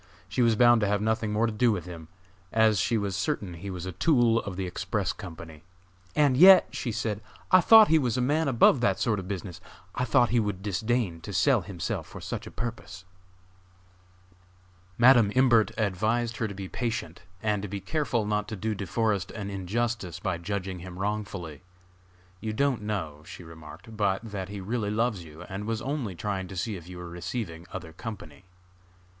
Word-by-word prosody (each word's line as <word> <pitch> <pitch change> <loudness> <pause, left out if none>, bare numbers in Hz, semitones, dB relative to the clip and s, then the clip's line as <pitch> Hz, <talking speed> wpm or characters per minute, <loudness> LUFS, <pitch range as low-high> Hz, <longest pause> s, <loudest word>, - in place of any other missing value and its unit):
She 105 +7 -1
was 115 -2 +4
bound 120 0 +5
to 105 - +2
have 100 +1 +1
nothing 110 0 0
more 110 +2 +2
to 115 - -1
do 115 +2 +3
with 90 -6 -3
him, 85 -3 -9 0.4
as 110 -2 +3
she 115 +4 +1
was 100 -2 -2
certain 95 -1 -2
he 90 +4 -7
was 90 -2 -5
a 95 - -4
tool 115 - +3
of 100 -3 -6
the 95 0 -3
Express 90 - -2
Company. 80 -2 -10 0.5
"And 145 -4 +4
yet," 185 +5 +9
she 120 - -3
said, 110 -2 -2 0.3
"I 185 0 +8
thought 220 +2 +8
he 160 0 +4
was 125 -4 0
a - - +1
man 150 +5 +1
above 130 0 +4
that 100 -5 +2
sort 110 -4 +1
of 95 - -7
business! 95 -3 -6 0.3
I 125 - -1
thought 120 0 +3
he 120 - +3
would 100 -3 -2
disdain 105 -3 -1
to 100 - -7
sell 100 +7 +3
himself 90 -1 -4
for - - -10
such - - -5
a - - -6
purpose." 100 -5 -6 1.9
Madam 120 -4 +6
Imbert 120 -4 +5
advised 110 +3 0
her 110 - -1
to 100 - -7
be 95 -1 -6
patient, 115 -7 -4 0.2
and 105 -2 +1
to 105 - -4
be 100 +1 -5
careful 120 0 -1
not 105 0 -1
to 110 - -5
do 110 +2 -2
De 100 -2 -5
Forest 105 -3 0
an 100 -2 -6
injustice 100 -1 -2
by 90 -4 -2
judging 95 0 -4
him 90 0 -9
wrongfully. 95 -6 -4 0.8
"You 110 +1 -4
don't 135 0 +1
know," 95 -9 -4
she - - -9
remarked, 80 +6 -12
"but 100 0 0
that 95 -2 -5
he 100 -1 -6
really 105 +2 -2
loves 110 -3 0
you, 80 -1 -11
and 100 +1 -6
was 115 0 -2
only 135 -7 -3
trying 95 +1 -3
to 95 - -8
see 105 +4 -2
if 85 -1 -10
you 90 - -8
were 90 0 -7
receiving 85 0 -5
other 80 -4 -7
company." 90 -6 -9
105 Hz, 195 wpm, -27 LUFS, 90-115 Hz, 1.9 s, yet